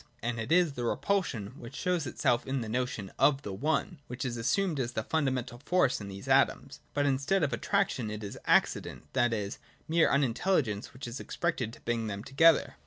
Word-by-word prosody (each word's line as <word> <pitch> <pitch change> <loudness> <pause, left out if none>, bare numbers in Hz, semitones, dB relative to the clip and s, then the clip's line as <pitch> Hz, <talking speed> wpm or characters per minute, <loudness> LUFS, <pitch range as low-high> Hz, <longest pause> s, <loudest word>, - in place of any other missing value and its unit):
And 120 0 -2
it 110 +5 -4
is 175 -3 +4
the 125 - -4
repulsion, 125 - -1
which 120 +4 -9
shows 175 -4 0
itself 125 -3 +1
in 135 -1 -1
the 115 - -4
notion 120 -4 -2
of 140 -1 +4
the 100 - -5
One, 155 - -1
which 125 +2 -5
is 125 -2 -2
assumed 155 - 0
as 120 -1 -2
the 110 - -2
fundamental 130 -5 -1
force 145 -4 +2
in 100 - -6
these 100 0 -8
atoms. - - +2 0.2
But 145 0 +2
instead 140 +7 +1
of 140 -4 0
attraction, 190 - 0
it 105 0 -5
is 100 - -6
Accident, - - +2
that 120 -3 +3
is, 105 -3 -3 0.3
mere 165 +1 +4
unintelligence, 130 - +1
which 125 0 -8
is 120 +3 -6
expected 150 -10 -2
to - - -14
bring 115 -1 -1
them 100 0 -4
together. 155 +5 +4
130 Hz, 195 wpm, -30 LUFS, 115-155 Hz, 0.3 s, is